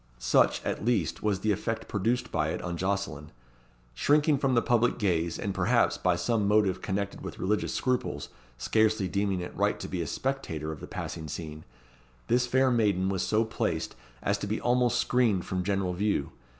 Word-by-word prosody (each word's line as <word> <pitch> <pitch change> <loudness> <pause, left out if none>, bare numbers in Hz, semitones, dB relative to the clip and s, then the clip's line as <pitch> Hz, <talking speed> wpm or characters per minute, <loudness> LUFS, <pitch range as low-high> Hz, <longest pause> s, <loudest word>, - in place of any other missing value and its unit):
Such, - - +2
at - - -2
least, 110 -8 0
was 100 -3 0
the 110 - +2
effect 115 +3 -2
produced 120 +5 -1
by 75 -2 0
it - - -2
on 85 -1 -3
Jocelyn. 90 -5 -2 0.6
Shrinking 145 - +3
from 135 -2 +1
the 115 - +4
public 120 0 +2
gaze, 85 -6 0
and, 100 - -3
perhaps, 100 +6 +2
from 90 -1 +1
some 110 0 +1
motive 105 -2 +2
connected 100 0 -3
with - - -7
religious 105 +3 -1
scruples, 130 -1 -1 0.3
scarcely 110 - +2
deeming 100 0 0
it 90 - -7
right - - +1
to - - -5
be 90 -2 -3
a 80 - -3
spectator 80 - -3
of 75 - -7
the - - -8
passing 80 -2 -5
scene, 75 +1 -7 0.6
this 125 +1 +3
fair 130 +1 +3
maiden 100 -5 +2
was 95 -2 -1
so 110 +1 +2
placed 110 - -2 0.3
as 100 +1 +1
to - - -4
be 110 +2 -1
almost 125 0 +2
screened 115 -7 +2
from 90 -1 -2
general 95 -1 0
view. 100 -6 0
100 Hz, 185 wpm, -28 LUFS, 90-120 Hz, 0.6 s, the